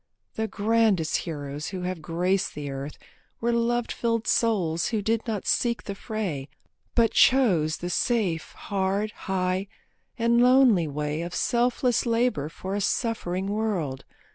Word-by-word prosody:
The 220 Hz, 0 st, -2 dB
grandest 210 Hz, -5 st, +2 dB
heroes 145 Hz, -1 st, -5 dB
who 185 Hz, -2 st, -5 dB
have 180 Hz, -2 st, -3 dB
graced 180 Hz, +4 st, 0 dB
the 145 Hz, -2 st, -5 dB
earth 135 Hz, +2 st, -6 dB, 0.4 s
Were 235 Hz, +1 st, 0 dB
love 235 Hz, 0 st, +1 dB
filled 230 Hz, -1 st, -1 dB
souls 180 Hz, -8 st, +1 dB
who 220 Hz, -, -1 dB
did 225 Hz, +3 st, -1 dB
not 215 Hz, -4 st, -2 dB
seek 235 Hz, -1 st, +1 dB
the 200 Hz, -, -5 dB
fray, 195 Hz, -10 st, -4 dB, 0.5 s
But 230 Hz, -2 st, +4 dB
chose 185 Hz, -, +4 dB
the 175 Hz, -, -5 dB
safe, 195 Hz, -8 st, 0 dB
hard, 200 Hz, +2 st, -1 dB
high, 190 Hz, -1 st, -2 dB, 0.5 s
and 235 Hz, 0 st, +3 dB
lonely 250 Hz, -9 st, +5 dB
way 150 Hz, +2 st, -3 dB
Of 170 Hz, +1 st, -5 dB
selfless 245 Hz, 0 st, +1 dB
labour 230 Hz, -, +1 dB
for 190 Hz, +4 st, -6 dB
a 205 Hz, -, -1 dB
suffering 195 Hz, -4 st, -1 dB
world. 195 Hz, -10 st, -2 dB
200 Hz, 140 wpm, -26 LUFS, 165-230 Hz, 0.5 s, lonely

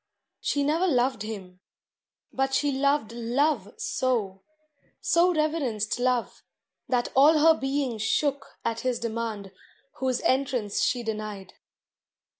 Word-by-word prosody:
She 285 Hz, -, 0 dB
never 320 Hz, +6 st, +2 dB
loved 255 Hz, -, +1 dB
him; 195 Hz, -4 st, -7 dB, 0.7 s
but 270 Hz, 0 st, 0 dB
she 290 Hz, -1 st, +2 dB
loved 280 Hz, -3 st, +1 dB
Love 240 Hz, -1 st, 0 dB
so, 215 Hz, -7 st, -1 dB, 0.6 s
So 345 Hz, +2 st, +3 dB
reverenced 285 Hz, -10 st, -1 dB
Love, 250 Hz, -1 st, 0 dB, 0.5 s
that 245 Hz, -2 st, +1 dB
all 295 Hz, +4 st, +6 dB
her 320 Hz, +2 st, +6 dB
being 270 Hz, -5 st, -2 dB
shook 280 Hz, +6 st, -1 dB
At 230 Hz, 0 st, -1 dB
his 255 Hz, -1 st, -1 dB
demand 225 Hz, -4 st, -4 dB, 0.5 s
whose 260 Hz, -2 st, 0 dB
entrance 255 Hz, -6 st, 0 dB
she 245 Hz, -1 st, +1 dB
denied. 215 Hz, -3 st, -5 dB
250 Hz, 115 wpm, -26 LUFS, 220-280 Hz, 0.7 s, all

